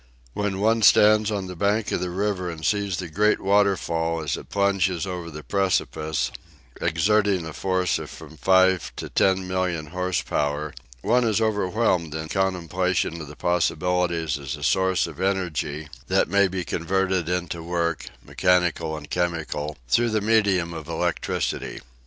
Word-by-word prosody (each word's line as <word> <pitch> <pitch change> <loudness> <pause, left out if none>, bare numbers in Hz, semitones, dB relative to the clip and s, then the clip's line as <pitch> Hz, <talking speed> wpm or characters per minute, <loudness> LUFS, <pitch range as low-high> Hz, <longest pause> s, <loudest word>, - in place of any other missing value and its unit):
When 105 -2 -2
one 110 +2 +2
stands 105 +1 +6
on 100 -3 -2
the 90 0 -7
bank 100 +3 0
of - - 0
the 90 - -2
river 95 -1 -1
and 80 -2 -6
sees 100 -3 0
the 90 - -4
great 105 +6 +2
waterfall 85 -5 +1
as 75 - -1
it - - -10
plunges 100 -3 +1
over 90 -3 -5
the 75 -1 -9
precipice, 80 -6 0 0.5
exerting 95 +2 +2
a 80 - -7
force 95 -1 0
of - - -7
from 80 -1 -11
five 95 +1 +3
to - - -6
ten 95 -1 +2
million 90 -4 -1
horse 90 -1 -1
power, 75 +1 -1 0.3
one 120 +4 +3
is 110 -2 +2
overwhelmed 100 -6 0
in 80 0 -5
contemplation 90 -2 0
of 75 - -8
its 75 - -13
possibilities 85 -2 0
as 70 -2 -5
a - - -9
source 95 -1 +2
of 80 +1 -8
energy 80 -6 -1 0.2
that - - +2
may 100 +3 +3
be 95 -1 -3
converted 95 0 -1
into 90 -2 -2
work, 85 -3 -2 0.2
mechanical 90 -3 +1
and 75 -1 -11
chemical, 80 -4 -2
through 120 - +3
the 110 -1 +1
medium 100 -6 +2
of 80 -2 -7
electricity. 85 +1 -2
90 Hz, 160 wpm, -24 LUFS, 80-100 Hz, 0.5 s, stands